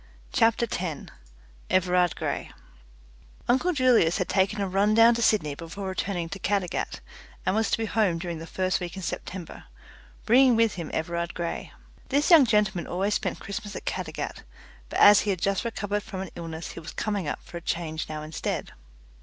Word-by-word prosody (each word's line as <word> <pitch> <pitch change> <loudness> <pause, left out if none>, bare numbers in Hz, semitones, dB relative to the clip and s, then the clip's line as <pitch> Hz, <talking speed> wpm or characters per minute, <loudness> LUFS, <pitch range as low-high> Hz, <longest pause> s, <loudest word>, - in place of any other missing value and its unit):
CHAPTER 230 +1 +3
TEN 175 -8 -4 0.6
Everard 180 -1 +2
Grey - - -3 1.0
Uncle 260 +9 +3
Julius 250 - +4
had - - -1
taken 195 +2 +1
a 200 - 0
run 200 +3 +2
down 230 +1 +7
to 235 - -2
Sydney 195 -10 +2
before 170 +6 -7
returning 185 -2 -2
to 195 - -6
Caddagat, 195 -2 -1 0.4
and 185 - +1
was 220 0 +1
to - - +2
be 225 - -1
home 210 -6 +1
during 170 -1 -5
the 165 - -8
first 185 +2 0
week 175 -1 -5
in 190 - -7
September, 175 0 -6 0.6
bringing 250 +2 +6
with 225 -2 +3
him 170 -3 -5
Everard 170 +1 -2
Grey. 170 -1 -4 0.4
This 290 +6 +2
young 310 -7 +8
gentleman 210 -5 +1
always 195 +4 0
spent - - -2
Christmas 200 +1 -6
at - - -7
Caddagat, - - -4 0.5
but - - -3
as 205 -1 +9
he 210 - -1
had 190 -3 0
just 195 +2 0
recovered 205 -3 -2
from 195 -3 -6
an 190 - -6
illness 165 -1 -6
he - - -8
was 165 - -9
coming 205 -6 -2
up - - -2
for 175 - -8
a - - -7
change 160 -2 -3
now 155 -1 -5
instead. 155 0 -4
190 Hz, 185 wpm, -26 LUFS, 170-215 Hz, 1.0 s, as